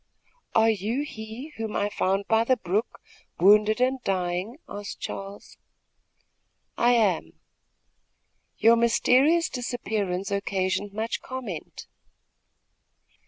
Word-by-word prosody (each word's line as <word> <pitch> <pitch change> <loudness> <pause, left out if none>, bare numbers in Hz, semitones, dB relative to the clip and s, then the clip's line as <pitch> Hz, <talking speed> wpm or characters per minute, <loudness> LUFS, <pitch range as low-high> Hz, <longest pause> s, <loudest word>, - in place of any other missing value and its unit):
"Are 225 0 +5
you 220 +7 -2
he 220 +2 -8
whom 225 -1 -4
I 205 - +1
found 195 0 0
by 225 0 +3
the 255 +2 +2
brook, 205 +3 -2 0.4
wounded 210 +4 +5
and 255 +1 +1
dying?" 185 +5 -2
asked 205 0 -7
Charles. 195 +1 -7 1.2
"I 240 +1 +3
am." 190 - +1 1.2
"Your 230 +2 +6
mysterious 260 +8 +3
disappearance 215 -6 -3
occasioned 200 0 -1
much 220 +2 -3
comment." 245 -11 -7
220 Hz, 100 wpm, -26 LUFS, 195-240 Hz, 1.2 s, Your